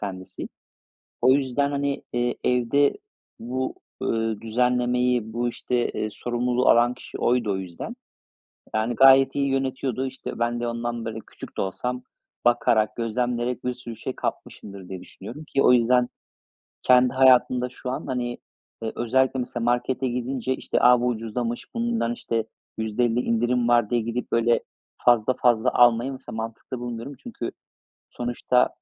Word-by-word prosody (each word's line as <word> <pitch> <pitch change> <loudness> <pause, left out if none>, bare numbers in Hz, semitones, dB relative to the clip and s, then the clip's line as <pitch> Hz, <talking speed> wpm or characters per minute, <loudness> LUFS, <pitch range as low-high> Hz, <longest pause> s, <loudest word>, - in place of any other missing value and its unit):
kendisi. 95 -3 -6 0.7
O 130 +2 +6
yüzden, 140 +1 +1
hani, 140 0 -1
eee, 120 0 0
evde 125 +3 +3 0.5
bu, 130 +3 -3 0.3
ııı, 115 -2 -1
düzenlemeyi, 125 0 +1
bu 120 +1 0
işte, 120 0 -1
ııı, 110 - -1
sorumluluğu 125 +2 0
alan 120 +1 +5
kişi 125 - -10
oydu 120 -4 +1
o - - -1
yüzden. 90 -3 -7 0.8
Yani, 110 +2 0
gayet 135 +1 +7
iyi 140 -1 +1
yönetiyordu. 135 -1 -1
İşte 130 -2 -7
ben 120 0 0
de 120 - -2
ondan, 120 0 -3
böyle, 110 0 -4
küçük - - -11
de - - 0
olsam 125 +6 -3 0.4
bakarak, 110 -3 +3
gözlemleyerek 120 +1 -2
bir 125 - 0
sürü 120 -2 -9
şey 130 +3 -5
kapmışımdır 100 -2 -6
diye 95 -1 -6
düşünüyorum 120 +11 -10
ki 140 -2 0
o 125 - +6
yüzden 125 +1 +4 0.7
kendi 125 0 +5
hayatımda 125 -1 +4
şu 125 +1 -7
an, 130 - -4
hani, 120 -1 -2 0.4
eee, 110 - -3
özellikle 130 +2 +1
mesela 120 -1 -3
markete 125 +2 0
gidince 125 +1 -2
işte, - - -3
"A, 125 0 +6
bu 125 - +1
ucuzlamış, 115 +1 -3
bundan 230 - 0
işte 115 -1 -2 0.3
%50 115 +2 0
indirim 120 +1 +1
var." 120 -3 +3
diye 120 -1 +1
gidip, 115 +2 -4
böyle, 115 0 +3 0.5
fazla 120 0 +5
fazla 120 -1 +3
almayı 120 +2 +4
mesela 130 -3 -8
mantıklı 115 +3 -5
bulmuyorum. 120 +3 -6
Çünkü 220 - -5 0.6
sonuçta, 120 +1 +1
120 Hz, 150 wpm, -25 LUFS, 115-125 Hz, 0.8 s, gayet